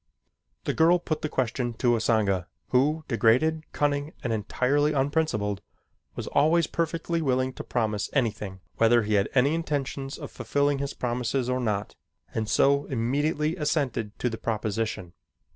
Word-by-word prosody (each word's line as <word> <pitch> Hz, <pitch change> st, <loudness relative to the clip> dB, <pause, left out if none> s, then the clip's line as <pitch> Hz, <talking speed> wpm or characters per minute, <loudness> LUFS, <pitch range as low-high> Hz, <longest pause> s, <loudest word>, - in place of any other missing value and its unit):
The -, -, -1 dB
girl 165 Hz, +2 st, +5 dB
put 155 Hz, -3 st, -3 dB
the 155 Hz, -, -2 dB
question 120 Hz, -3 st, -1 dB
to 120 Hz, +2 st, +2 dB
Usanga, 105 Hz, -6 st, +1 dB, 0.2 s
who, 150 Hz, +5 st, +2 dB
degraded, 130 Hz, +8 st, +2 dB
cunning, 145 Hz, +1 st, 0 dB
and 115 Hz, -, 0 dB
entirely 135 Hz, +8 st, +1 dB
unprincipled, 135 Hz, -8 st, 0 dB, 0.5 s
was -, -, -4 dB
always 160 Hz, +3 st, +3 dB
perfectly 165 Hz, 0 st, -1 dB
willing 130 Hz, -2 st, +1 dB
to -, -, -7 dB
promise 110 Hz, -4 st, -1 dB
anything 105 Hz, -7 st, -1 dB, 0.2 s
whether 115 Hz, 0 st, +5 dB
he 105 Hz, 0 st, -1 dB
had 100 Hz, 0 st, +2 dB
any 135 Hz, +4 st, +4 dB
intentions 140 Hz, -4 st, -3 dB
of -, -, -8 dB
fulfilling 145 Hz, 0 st, 0 dB
his 140 Hz, 0 st, -3 dB
promises 125 Hz, +1 st, -1 dB
or 125 Hz, 0 st, 0 dB
not, 105 Hz, -4 st, -2 dB, 0.4 s
and 110 Hz, -1 st, -2 dB
so 140 Hz, +1 st, +3 dB
immediately 145 Hz, +6 st, 0 dB
assented 140 Hz, -, -1 dB
to -, -, -1 dB
the 115 Hz, -2 st, -3 dB
proposition. 110 Hz, -4 st, -2 dB
130 Hz, 145 wpm, -27 LUFS, 110-145 Hz, 0.5 s, girl